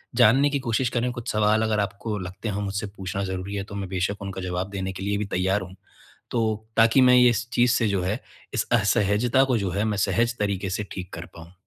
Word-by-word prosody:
जानने 130 +4 +5
की 140 - 0
कोशिश 120 -1 0
करें, 125 +1 -1
कुछ 120 -1 -5
सवाल 110 +1 +3
अगर 110 -1 +1
आपको 105 +1 -3
लगते 95 +4 -6
हों 105 0 -2
मुझसे 100 +2 -3
पूछना 95 +1 -3
ज़रूरी 95 +2 -4
हैं 100 0 -3
तो 100 - -9
मैं 95 -2 -4
बेशक 95 +2 -2
उनका 95 -1 -5
जवाब 90 +1 -3
देने 95 -1 -3
के 95 - -7
लिए 100 0 0
भी 105 - -2
तैयार 95 +1 0
हूँ। 95 0 -9 0.6
तो 110 -2 -1
ताकि 115 +3 +5
मैं 125 0 +7
ये 125 0 +7
इस 120 +1 -2
चीज़ 125 +1 +3
से 115 -3 +2
जो 100 -3 0
है, 105 +7 -2 0.3
इस - - 0
असहजता 110 +3 +3
को 130 -3 +1
जो 100 -3 -2
है 100 +4 -1
मैं 105 -2 0
सहज 115 +5 +1
तरीके 100 -2 -1
से 105 +2 -2
ठीक 90 -1 -7
कर - - -7
पाऊँ। 85 +1 -12
105 Hz, 235 wpm, -25 LUFS, 95-115 Hz, 0.6 s, मैं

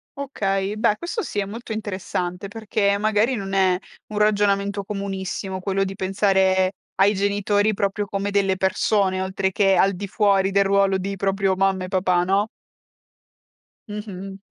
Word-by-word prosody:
Okay. 200 -8 -2
Beh 215 -1 +2
questo 350 - -3
sì 210 - -6
è 200 - 0
molto 225 +4 -8
interessante, 190 -3 -4
perché 205 -1 0
magari 215 +4 +2
non 195 -3 -5
è 190 -2 +3 0.3
un 210 - -6
ragionamento 200 -1 +2
comunissimo 195 -1 -4
quello 195 +1 0
di 195 0 -3
pensare 190 -1 +2 0.2
ai 200 +2 +4
genitori 205 +1 +1
proprio 200 +1 -1
come 200 +1 -2
delle 195 -2 +1
persone, 190 0 +1
oltre 190 0 -1
che 195 0 +3
al 195 +1 +3
di 200 +2 -5
fuori 195 -1 +2
del 200 0 +3
ruolo 195 0 +3
di 195 +1 -3
proprio 195 0 0
mamma 190 0 +1
e - - -4
papà, 185 -2 +2
no? 195 +3 +1 1.4
Mh-mh. 195 -2 -7
195 Hz, 155 wpm, -23 LUFS, 190-205 Hz, 1.4 s, ai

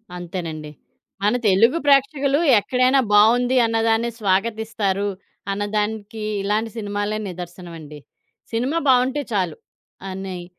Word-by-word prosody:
అంతేనండి. 165 -4 -6 0.5
మన 210 +4 +2
తెలుగు 225 - +4
ప్రేక్షకులు 280 0 +3 0.2
ఎక్కడైనా 255 +5 +2
బావుంది 240 +5 +4
అన్నదాన్నే 225 +1 +1
స్వాగతిస్తారు, 205 0 0 0.4
అన్నదానికి 210 +1 -3 0.2
ఇలాంటి 215 +3 -1
సినిమాలే 205 0 -2
నిదర్శనమండి. 170 -4 -9 0.5
సినిమా 260 +9 0
బావుంటే 260 +3 +3
చాలు 180 -6 -1 0.5
అనయ్ 185 -2 -6
210 Hz, 90 wpm, -21 LUFS, 190-235 Hz, 0.5 s, తెలుగు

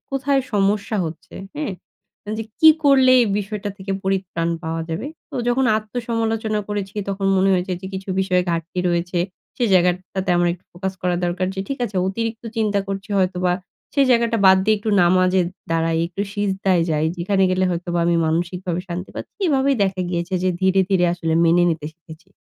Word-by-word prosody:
কোথায় 275 0 +1
সমস্যা 205 +1 +1
হচ্ছে, 165 +5 -10 0.2
হ্যাঁ? 295 -9 -2 0.7
যে 225 - -3 0.2
কি 320 - +9 0.2
করলে 265 -2 +6
এই - - +4
বিষয়টা 205 0 -4
থেকে 195 +1 -4
পরিত্রাণ 190 -3 -1
পাওয়া 165 0 -3
যাবে। 165 +11 -3 0.2
তো, - - -10
যখন 255 +2 +2
আত্মসমালোচনা 225 -1 -2
করেছি, 200 -2 -4
তখন 195 0 -2
মনে 190 +1 +3
হয়েছে 185 +1 -1
যে, 190 - -7
কিছু 190 +1 -6
বিষয়ে 185 -1 +2
ঘাটতি 170 +2 -3
রয়েছে। 175 +1 -1 0.4
সে 245 - 0
জায়গা 180 0 +5 0.2
টাতে 190 -1 -1
আমার 175 0 +3
একটু 175 +1 -11
ফোকাস 190 +2 -4
করা 180 -1 +1
দরকার 175 +1 -1
যে, 195 - -3
ঠিক 275 - -3
আছে, 205 -4 -5
অতিরিক্ত 225 +3 -3
চিন্তা 210 -2 +1
করছি 195 +2 -5
হয়তোবা। 180 -1 +1 0.4
সে 280 - +2
জায়গাটা 235 -1 +3
বাদ 190 0 +8
দিয়ে 215 +1 +3
একটু 215 +1 -2
নামাজে 185 +1 +3 0.3
দাঁড়াই, 165 0 +1
একটু 180 +3 -4
সিজদায় 195 -3 +1
যাই, 155 +1 +1
যেখানে 190 +3 +1
গেলে 185 0 +1
হয়তোবা 175 0 -2
আমি 170 - +3
মানসিকভাবে 175 +2 -1
শান্তি 180 +2 -5
পাচ্ছি। - - -8
এভাবেই 275 -2 +2
দেখা 190 -1 -2
গিয়েছে 175 +1 -2
যে, 185 - +2
ধীরে, 190 0 +3
ধীরে, 190 -3 +3
আসলে 165 -2 -2
মেনে 170 +1 +4
নিতে 155 -2 -3
শিখেছি। 170 +2 -15
190 Hz, 180 wpm, -21 LUFS, 175-210 Hz, 0.7 s, কি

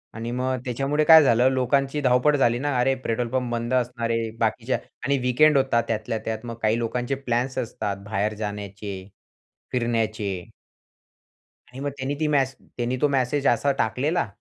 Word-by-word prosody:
आणि 115 +1 -4
मग 130 +1 -1
त्याच्यामुळे 135 +5 0
काय 160 -1 +9
झालं, 125 0 +4
लोकांची 135 +2 +1
धावपळ 130 +3 +3
झाली 120 -2 +2
ना. 145 -2 -1
अरे! 135 +2 +3
पेट्रोल 115 +1 -1
पंप 125 -1 -1
बंद 120 +1 -2
असणार 120 -2 0
आहे, 115 -1 0
बाकीच्या 115 +2 0 0.3
आणि 140 0 +2
वीकेंड 150 +4 +5
होता 130 -3 +2
त्यातल्या 110 0 -2
त्यात, 110 +1 -4
मग 115 - -5
काही 110 +1 +2
लोकांचे 120 +3 -2
प्लॅन्स 130 -1 -2
असतात, 100 -3 -3
बाहेर 105 0 0
जाण्याचे, 100 -1 -5 0.7
फिरण्याचे. 110 -6 -1 1.2
आणि 130 - -10
मग 145 +1 -2
त्यांनी 135 +2 -2
ती 155 - +1
मेसे 135 -3 0
त्यांनी 125 +1 -1
तो 150 - +5
मेसेज 135 +1 0
असा 140 +4 +3
टाकलेला, 140 +8 0
125 Hz, 160 wpm, -24 LUFS, 115-135 Hz, 1.2 s, काय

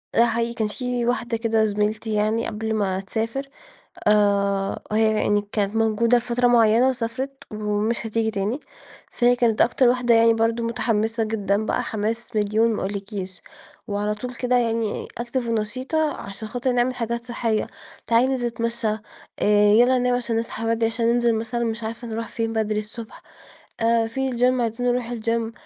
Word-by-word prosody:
آه، 235 - +6
حقيقي 235 0 -1
كان 220 -3 -1
في 245 +1 -2
واحدة 235 -1 -1
كده 225 -1 +2
زميلتي 210 +1 -1
يعني 215 +2 +1
قبل 220 +1 -3
ما 190 -3 0
تسافر، 225 +7 -3 0.6
آآ، 200 -2 +2
هي 220 0 +3
يعني 205 0 +2
كانت 205 0 -1
موجودة 225 +2 +3
فترة 245 +1 +1
معيّنة 235 +1 +5
وسافرت، 260 +2 -4
ومش 215 +2 -1
هتيجي 225 0 0
تاني، 210 +7 -2 0.5
فهي 245 0 +3
كانت 235 -3 +2
أكتر 245 +1 +4
واحدة 245 -1 +2
يعني 230 0 +5
برضه 225 +1 0
متحمسة 225 -1 0
جدًا 210 -1 0
بقى - - 0
حماس 225 +2 -3
مليون 215 +2 +2
ما - - -3
اقولكيش، 195 -1 -5 0.5
وعلى 210 +1 -1
طول 250 +3 -7
كده 250 +1 +1
يعني 230 -2 -1
Active 240 0 -3
ونشيطة 255 +8 -1
عشان 200 +2 -7
خاطر 245 +3 -1
نعمل 245 +1 +1
حاجات 235 0 -3
صحية، 230 -3 -1 0.4
تعالي 235 +2 +4
ننزل 255 -2 0
نتمشى، 230 0 -2 0.5
آآ، 205 0 +4
يلّا 245 +3 +5
ننام 250 0 +2
عشان 235 -2 -1
نصحى 230 0 -4
بدري 230 0 +1
عشان 230 +1 -1
ننزل 235 -1 +2
مثلًا 230 +2 -2
مش 225 0 -3
عارفة 230 +2 -5
نروح 225 0 -4
فين 225 -1 -3
بدري 215 -1 0
الصبح، 220 +1 -9 0.6
آآ، 230 0 +3
في 265 +3 -2
الGym 250 +1 +2
عايزين 235 +1 -1
نروح 245 -1 0
الGym 230 0 -1
230 Hz, 165 wpm, -23 LUFS, 215-240 Hz, 0.6 s, آه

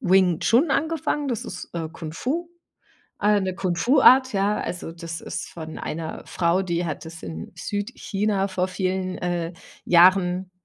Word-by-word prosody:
Wing 185 -5 +4
Chun 275 +6 +3
angefangen, 295 0 0
das 235 -4 -2
ist, - - -7
äh, 165 -2 -3
Kung 160 -3 -7
Fu, 290 - -2 0.7
äh, 210 0 +4
'ne 185 -1 -2
Kung 185 -3 -1
Fu 245 - +3
Art, 260 -1 +7
ja. 200 +1 +1
Also, 175 -2 -4
das 165 -1 -7
ist - - -5
von 160 -2 -8
einer 160 0 -5
Frau, 170 +1 +1
die 175 -2 -1
hat 155 0 -5
das 165 0 -10
in 80 -2 -7
Südchina 205 0 -2
vor 185 -1 0
vielen, 185 0 -2
äh, 175 -1 -2 0.3
Jahren, 180 +1 +4
185 Hz, 165 wpm, -24 LUFS, 170-205 Hz, 0.7 s, Art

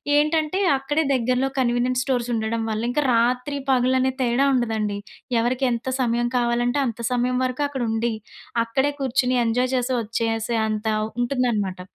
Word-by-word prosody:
ఏంటంటే 310 +4 +2 0.2
అక్కడే 290 +4 0
దగ్గరలో 255 +1 +1
కన్వీనియంట్ 250 +1 +1
స్టోర్స్ 245 -3 -1
ఉండడం 225 +1 -1
వల్ల, 215 0 -2
ఇంకా 295 +3 +1
రాత్రి 250 +4 +1
పగలు 255 0 +3
అనే 260 0 +1
తేడా 245 +3 +2
ఉండదండి. 220 -4 -1 0.4
ఎవరికి 255 +3 +1
ఎంత 235 +2 -5
సమయం 240 0 +1
కావాలంటే 240 +3 +1
అంత 230 0 -5
సమయం 250 +1 +1
వరకు 255 +3 -2
అక్కడ 265 -3 -3
ఉండి, 225 +1 0 0.5
అక్కడే 265 +5 0
కుర్చుని 255 -1 +1
ఎంజాయ్ 250 +3 +1
చేసి, 250 +1 -1
వచ్చేసే 225 +1 -1
అంత 215 0 -2 0.3
ఉంటుందనమాట. 235 -7 0
245 Hz, 145 wpm, -23 LUFS, 230-260 Hz, 0.5 s, పగలు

